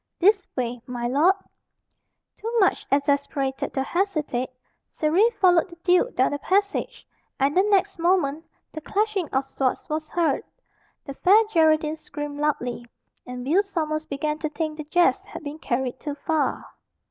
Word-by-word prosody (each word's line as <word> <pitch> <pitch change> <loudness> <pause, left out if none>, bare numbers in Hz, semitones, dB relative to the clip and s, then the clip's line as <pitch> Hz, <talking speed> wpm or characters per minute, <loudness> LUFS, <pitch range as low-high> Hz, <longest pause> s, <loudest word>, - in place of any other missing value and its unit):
This 395 +1 +3
way, 245 -1 -2
my 240 -1 -3
lord." 305 +10 +4 1.0
Too 455 - -5
much 385 - +2
exasperated 280 -1 0
to 265 - +1
hesitate, 305 -7 -1 0.4
Surrey 345 +9 +3
followed 360 -2 +4
the 340 - -12
duke 365 +7 +3
down - - +3
the 290 - -3
passage, 400 +5 -1 0.3
and 275 +2 +2
the 370 - +6
next 400 -2 +1
moment 330 -4 +1 0.3
the 315 - -7
clashing 405 -1 -1
of 265 0 0
swords 270 -1 -2
was 310 0 -3
heard. 340 -2 +1 0.6
The 275 - -6
Fair 400 +10 +5
Geraldine 315 -1 +3
screamed 295 -1 -7
loudly, 245 -5 -1 0.4
and 250 0 -6
Will 335 +9 +4
Sommers 310 -6 -3
began 300 +2 -3
to 310 - -2
think 310 0 -3
the 305 - -6
jest 350 +3 +2
had - - -10
been 300 +1 -7
carried 255 -1 -2
too 290 -1 -5
far. 310 +1 -1
310 Hz, 155 wpm, -24 LUFS, 280-360 Hz, 1.0 s, the